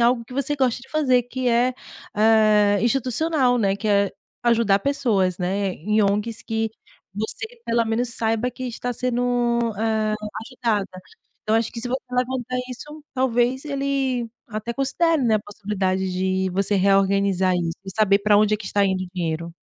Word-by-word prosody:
algo 235 Hz, 0 st, +3 dB
que 240 Hz, -, -13 dB
você 280 Hz, +2 st, -1 dB
gosta 255 Hz, -3 st, +1 dB
de 265 Hz, -, -15 dB
fazer, 260 Hz, -5 st, +2 dB
que 255 Hz, +1 st, -4 dB
é, 245 Hz, +2 st, +2 dB, 0.4 s
hã, 215 Hz, -2 st, +4 dB
institucional, 255 Hz, +2 st, +1 dB
né, 195 Hz, -2 st, +1 dB
que 210 Hz, +2 st, -5 dB
é 200 Hz, -1 st, +3 dB, 0.3 s
ajudar 230 Hz, -4 st, +3 dB
pessoas, 200 Hz, -10 st, +1 dB
né, 195 Hz, +2 st, -1 dB
em 210 Hz, +6 st, +1 dB
ONGs 210 Hz, +3 st, 0 dB
que 225 Hz, 0 st, -1 dB, 0.5 s
você 220 Hz, -, -3 dB, 0.2 s
pelo 230 Hz, 0 st, +1 dB
menos 225 Hz, +2 st, -1 dB
saiba 225 Hz, +2 st, -1 dB
que 255 Hz, +1 st, -7 dB
está 245 Hz, 0 st, -3 dB
sendo, 245 Hz, 0 st, -1 dB, 0.6 s
eh, 220 Hz, -1 st, +1 dB, 0.3 s
ajudada". 220 Hz, -7 st, -2 dB, 0.4 s
Então, 220 Hz, +1 st, +2 dB
eu -, -, +5 dB
acho 225 Hz, -, -2 dB
que 230 Hz, -, -6 dB
se 245 Hz, -, -4 dB
você 260 Hz, +2 st, -1 dB
levantar 250 Hz, 0 st, -1 dB
isso, 295 Hz, +4 st, -9 dB
talvez, 255 Hz, 0 st, +1 dB
ele 275 Hz, -4 st, -1 dB, 0.2 s
até 215 Hz, +2 st, -4 dB
considere, 290 Hz, +4 st, +1 dB
né, 220 Hz, -2 st, +3 dB
a -, -, -3 dB
possibilidade 190 Hz, -2 st, -2 dB
de 190 Hz, +1 st, 0 dB
você 195 Hz, +2 st, 0 dB
reorganizar 195 Hz, -1 st, +3 dB
isso 165 Hz, -1 st, -2 dB
e 190 Hz, -, -6 dB
saber 205 Hz, -2 st, +3 dB
pra 205 Hz, 0 st, +4 dB
onde 215 Hz, 0 st, +3 dB
é -, -, 0 dB
que 210 Hz, -, -10 dB
está 200 Hz, 0 st, +2 dB
indo 190 Hz, -1 st, 0 dB
o -, -, -10 dB
dinheiro. 170 Hz, -1 st, -3 dB
225 Hz, 175 wpm, -23 LUFS, 200-250 Hz, 0.6 s, eu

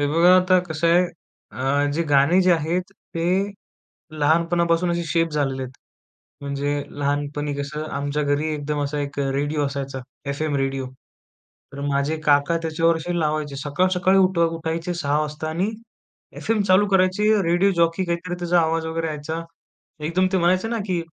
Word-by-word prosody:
हे 145 Hz, -, +2 dB
बघा 170 Hz, +4 st, +5 dB
आता 185 Hz, 0 st, +4 dB
कसं 160 Hz, +1 st, 0 dB
आहे 175 Hz, +2 st, +5 dB, 0.5 s
अ, 140 Hz, +2 st, 0 dB
जे 170 Hz, -, +1 dB
गाणे 145 Hz, +6 st, +5 dB
जे 185 Hz, -, +3 dB
आहेत 170 Hz, +3 st, -1 dB, 0.3 s
ते 165 Hz, -, -1 dB, 1.0 s
लहानपणापासून 170 Hz, +2 st, +2 dB
असे 170 Hz, 0 st, -2 dB
शेप 165 Hz, +1 st, +1 dB
झालेले 135 Hz, -3 st, -1 dB
आहेत. 130 Hz, 0 st, -7 dB, 0.7 s
म्हणजे 140 Hz, +1 st, -2 dB, 0.2 s
लहानपणी 145 Hz, +1 st, -1 dB
कसं 145 Hz, +2 st, -4 dB
आमच्या 145 Hz, +1 st, -1 dB
घरी 145 Hz, +1 st, 0 dB
एकदम 150 Hz, 0 st, -3 dB
असा 145 Hz, +1 st, -3 dB
एक 145 Hz, 0 st, -5 dB
रेडिओ 145 Hz, +2 st, 0 dB
असायचा 140 Hz, -1 st, -4 dB, 0.3 s
एफ-एम 145 Hz, +1 st, -1 dB
रेडिओ. 135 Hz, -1 st, -1 dB, 0.9 s
तर 140 Hz, -, -7 dB
माझे 140 Hz, +3 st, 0 dB
काका 145 Hz, +3 st, +3 dB
त्याच्यावर 165 Hz, +1 st, +2 dB
अशी 175 Hz, +2 st, -3 dB
लावायचे. 150 Hz, -2 st, -1 dB
सकाळ-सकाळी 185 Hz, +6 st, +2 dB
उठ 185 Hz, -2 st, +3 dB
उठायचे 165 Hz, +1 st, -1 dB
06:00 145 Hz, -3 st, 0 dB
वाजता 150 Hz, +1 st, -4 dB
आणि 180 Hz, +7 st, -1 dB, 0.7 s
एफएम 225 Hz, -2 st, 0 dB
चालू 195 Hz, +2 st, +4 dB
करायचे 190 Hz, +1 st, +2 dB, 0.2 s
रेडिओ 175 Hz, +4 st, +3 dB
जॉकी 170 Hz, +2 st, +2 dB
काहीतरी 170 Hz, +1 st, -3 dB
त्याचा 175 Hz, 0 st, +2 dB
आवाज 165 Hz, 0 st, 0 dB
वगैरे 165 Hz, 0 st, -2 dB
यायचा. 155 Hz, +2 st, -4 dB, 0.6 s
एकदम 170 Hz, +5 st, +1 dB
ते -, -, +4 dB
म्हणायचे 185 Hz, +4 st, +2 dB
ना, 230 Hz, 0 st, -2 dB
की 180 Hz, -3 st, 0 dB
160 Hz, 155 wpm, -22 LUFS, 145-175 Hz, 1.0 s, बघा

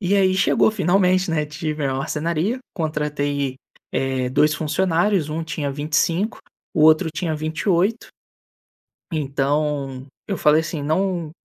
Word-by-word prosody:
E 195 Hz, +1 st, +1 dB
aí, 190 Hz, -1 st, +3 dB
chegou 200 Hz, +2 st, +3 dB
finalmente, 185 Hz, -2 st, +2 dB
né? 155 Hz, -2 st, +1 dB
Tive 155 Hz, -1 st, -4 dB
a 135 Hz, -, 0 dB
marcenaria, 165 Hz, -, -1 dB
contratei, 145 Hz, -5 st, -2 dB, 0.4 s
eh, 130 Hz, -1 st, -1 dB
dois 150 Hz, +3 st, +3 dB
funcionários, 170 Hz, +2 st, +1 dB
um 160 Hz, +2 st, -3 dB
tinha 155 Hz, -3 st, -3 dB
25, 160 Hz, +8 st, 0 dB, 0.3 s
o 160 Hz, -5 st, +1 dB
outro 155 Hz, +1 st, +5 dB
tinha 160 Hz, 0 st, -2 dB
28. 170 Hz, +7 st, 0 dB, 1.0 s
Então, 140 Hz, -2 st, -1 dB, 0.2 s
eu 195 Hz, -, -2 dB
falei 150 Hz, +1 st, +4 dB
assim 155 Hz, -2 st, -4 dB
não 170 Hz, +1 st, -1 dB
155 Hz, 125 wpm, -22 LUFS, 150-180 Hz, 1.0 s, outro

